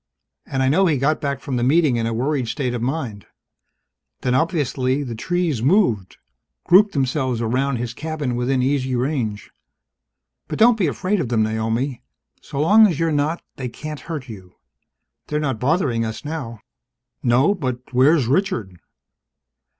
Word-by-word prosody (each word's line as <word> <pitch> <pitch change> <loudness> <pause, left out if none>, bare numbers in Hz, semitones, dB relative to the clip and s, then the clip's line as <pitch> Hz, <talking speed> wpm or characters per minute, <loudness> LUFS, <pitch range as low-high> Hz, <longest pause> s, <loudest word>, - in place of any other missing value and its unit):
And 135 -1 -1
I - - +2
know 185 +8 +3
he 155 -4 +2
got 145 +4 +1
back 140 -2 -2
from 130 -3 -3
the 120 - 0
Meeting 145 0 +3
in 115 -1 -1
a - - -1
worried 130 +2 -1
state 125 0 -2
of 120 - -3
mind. 125 -6 -3 0.9
Then, 125 - 0
obviously, 135 -3 0
the 125 -4 -5
trees 165 +1 -1
moved 120 - +2 0.5
grouped 200 +3 +5
themselves 130 -3 0
around 125 +4 0
his 120 0 -4
cabin 150 -3 -3
within 125 +1 0
easy 130 -1 0
range. 120 -5 -2 1.0
But - - -4
don't 225 0 +5
be 180 - +2
afraid 185 - -1
of 130 - -2
them, 115 -2 +2
Naomi. 115 +4 -1 0.4
So 140 - -6
long 210 +8 +6
as 170 -6 -2
you're 165 -1 +1
not, 150 +3 0
they 130 -2 -4
can't 150 +4 -7
hurt 155 -6 -6
you. 95 -6 -11 0.7
They're 150 - -1
not 135 -7 -2
bothering 130 - +1
us 110 +5 -5
now." 135 -8 -5 0.6
"No. 125 +10 +3
But 130 -8 -5
where's 135 +3 +4
Richard?" 120 - -1
135 Hz, 160 wpm, -21 LUFS, 120-155 Hz, 1.0 s, long